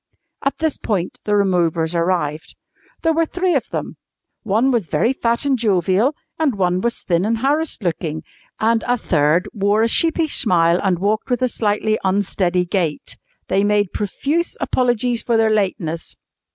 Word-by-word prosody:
At 275 - -1
this 315 -2 -1
point 185 -5 -2
the 210 - +1
removers 175 -4 +1
arrived. 170 -3 -1 0.5
There 325 -1 +3
were 330 0 +1
three 360 +1 0
of 275 - -1
them. - - -5 0.4
One 225 +5 +1
was 230 -8 0
very 165 - +1
fat 235 0 0
and 270 -3 +1
jovial, 205 - +2 0.2
and 295 -7 +1
one 180 -1 +1
was 235 +2 -2
thin 170 -1 +1
and 225 +3 0
harassed 285 +1 -1
looking, 160 -3 -3 0.4
and 225 0 +2
a 245 0 +2
third 160 -3 +1
wore 205 +1 +2
a - - +3
sheepish 325 +4 +2
smile 170 -5 +3
and 190 -3 +1
walked 210 +6 -1
with 245 0 0
a - - +4
slightly 215 -1 0
unsteady 185 -2 0
gait. 175 -5 -2 0.3
They 195 +1 +1
made 205 -2 +1
profuse 285 - -2
apologies 245 -1 0
for 235 -2 +1
their 220 -1 +3
lateness. 185 -6 -2
210 Hz, 165 wpm, -19 LUFS, 180-245 Hz, 0.5 s, a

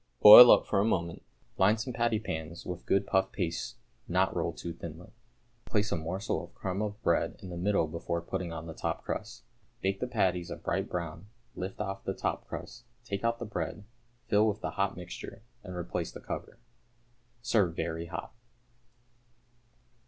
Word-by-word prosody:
Boil 115 +4 +13
up - - +7
for 100 - +1
a - - +4
moment. 85 -6 -1 0.4
Line 105 +4 +5
some 125 +3 -4
patty 115 -2 +1
pans 85 -4 -5
with 90 -1 -6
good 100 0 +3
puff 95 0 +1
paste 85 -4 -3 0.3
not - - +1
rolled - - -2
too 85 - -5
thinly, 85 +1 -9 0.5
place 105 -1 0
a - - +2
morsel 85 +5 -2
of - - -13
crumb 95 +1 -3
of 105 0 -3
bread 85 - +1
in 95 - -9
the - - -5
middle 95 0 +2
before 85 +2 -3
putting 90 0 -4
on 80 0 -6
the 80 - -7
top - - -3
crust; - - -5 0.4
bake 95 0 -1
the 125 - -2
patties 90 -7 0
a - - -4
bright - - -2
brown, 85 +1 -5 0.3
lift 95 +2 -5
off 95 -1 -4
the 95 - -3
top - - -3
crust, 120 0 -8 0.2
take 100 -4 -4
out 115 0 +1
the 120 - -5
bread, 105 -1 -4 0.4
fill 105 +1 +3
with 110 0 -1
the - - -3
hot 100 -2 -1
mixture, 90 +3 -8 0.2
and 90 - -7
replace 85 0 -3
the - - -9
cover. - - -6 0.9
Serve 100 -8 +2
very 85 0 -3
hot. 85 -1 -6
95 Hz, 180 wpm, -30 LUFS, 85-105 Hz, 0.9 s, Boil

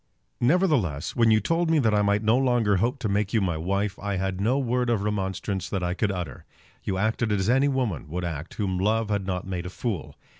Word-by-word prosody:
Nevertheless, 120 - +1
when 115 -1 +4
you 110 -1 +5
told 165 - 0
me 165 - +4
that 115 -7 +3
I 105 - +3
might 100 +1 +2
no 110 +2 +4
longer 120 -6 +2
hope 120 +8 0
to 115 - 0
make 100 0 0
you - - +5
my 90 -5 0
wife, 100 +5 -1
I 100 0 -2
had 95 0 -2
no 120 +6 +2
word 125 -2 0
of 110 -4 +1
remonstrance 95 -2 -2
that 95 -3 -2
I 90 0 0
could 100 +2 0
utter. 90 -3 -5 0.4
You 95 - -2
acted 110 +2 0
as 100 +2 +1
any 135 +3 +4
woman 125 - -1
would 90 +2 -3
act 80 -1 -5
whom 95 -4 -1
love 110 +3 +1
had 100 -2 -1
not 90 -1 -2
made 90 -1 -4
a - - -5
fool. 100 -2 -4
105 Hz, 230 wpm, -26 LUFS, 95-120 Hz, 0.4 s, you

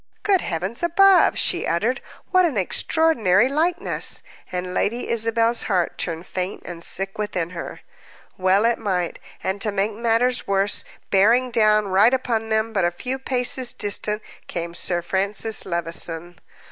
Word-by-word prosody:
"Good 390 -3 +3
heavens 185 +8 -3
above," 370 +3 +5
she 355 - 0
uttered, 220 +10 0 0.3
"what 370 -1 +5
an 315 -10 0
extraordinary 230 - +2
likeness!" 335 +7 -1 0.3
And 180 0 -4
Lady 235 +6 -1
Isabel's 230 +1 +1
heart 180 -4 0
turned 165 0 -3
faint 185 +1 -4
and 170 -1 -6
sick 195 +3 -1
within 180 -5 -2
her. 170 -2 -7 0.5
Well 190 +3 +2
it 235 0 +2
might. 185 -5 -2 0.2
And, 190 +1 -2
to 210 - +1
make 200 +2 -1
matters 235 +3 +1
worse, 195 +1 +1 0.3
bearing 230 +6 +4
down 215 -2 +3
right 205 +7 +5
upon 225 -4 -2
them, 220 +1 0
but 195 - +1
a 175 - +3
few 250 +10 -5
paces 255 -1 0
distant, 210 +1 -1 0.2
came 170 0 -5
Sir 175 0 -1
Francis 200 +4 0
Levison. 170 0 -3
210 Hz, 145 wpm, -22 LUFS, 185-245 Hz, 0.5 s, above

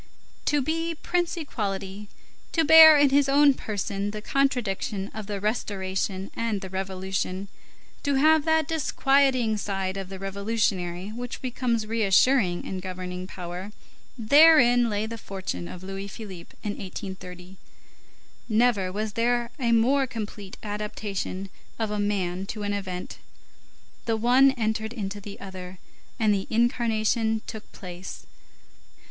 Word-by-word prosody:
To 290 -2 +2
be 330 +3 -1
Prince 350 +2 -1
Equality, 200 - -4 0.4
to 325 -1 +3
bear 315 0 +10
in 285 -1 +5
his 280 0 +4
own 285 0 +6
person 200 -3 -3
the 210 +1 -5
contradiction 215 -8 0
of 215 -2 -6
the 205 -1 -3
Restoration 195 -2 -2
and 225 -4 -1
the 190 -2 -7
Revolution, 190 0 -3 0.5
to 285 -1 0
have 310 +2 +5
that 320 -2 +2
disquieting 270 -7 +2
side 195 -2 -2
of 195 -1 -5
the 195 - -7
revolutionary 195 -2 -2
which 245 +2 -6
becomes 245 -3 -1
reassuring 215 -2 +3
in 190 - -4
governing 185 0 -6
power, 180 +3 -7 0.4
therein 245 -1 +6
lay 210 0 -1
the 230 +1 -6
fortune 190 - -5
of 180 - -9
Louis 195 +1 -5
Philippe 195 -4 -10
in 210 - -1
1830; 185 -1 -8 0.9
never 215 -4 +2
was 210 +2 -3
there 240 +1 +1
a 235 -3 +1
more 260 +4 +3
complete 210 -4 -7
adaptation 205 -2 -4 0.3
of 220 -2 -2
a 210 - -2
man 195 -2 -1
to 210 0 -5
an 205 0 -1
event; 185 -3 -5 0.9
the 225 -1 +1
one 250 +4 +5
entered 220 -2 -2
into 205 -3 -5
the 200 0 -9
other, 185 -1 -8 0.4
and 220 -3 +3
the 195 -1 -2
incarnation 225 -1 +1
took 220 -1 -9
place. 180 0 -9
210 Hz, 135 wpm, -26 LUFS, 190-245 Hz, 0.9 s, bear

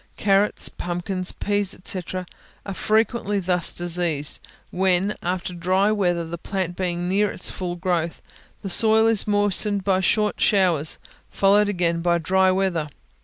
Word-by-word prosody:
Carrots, 200 0 +2
pumpkins, 180 +1 -3
peas, 205 -1 -2
&c., 185 - 0 0.6
are 195 - -4
frequently 215 0 0
thus 180 -2 0
diseased, 170 -4 -1 0.3
when, 190 +2 +1
after 180 0 -3
dry 185 +4 +1
weather, 175 -5 0
the 165 +1 -7
plant 185 -2 -3
being 175 -1 -2
near 200 +3 +2
its 180 - 0
full 180 -2 -4
growth, 175 -2 -2 0.4
the 195 - -4
soil 220 +2 +4
is 225 -2 +2
moistened 205 -1 +1
by 190 -1 +2
short 210 +2 +1
showers, 175 -7 +2 0.3
followed 205 +1 +3
again 170 -3 0
by 170 0 +2
dry 190 +3 +2
weather. 185 -5 -1
185 Hz, 140 wpm, -23 LUFS, 175-205 Hz, 0.6 s, soil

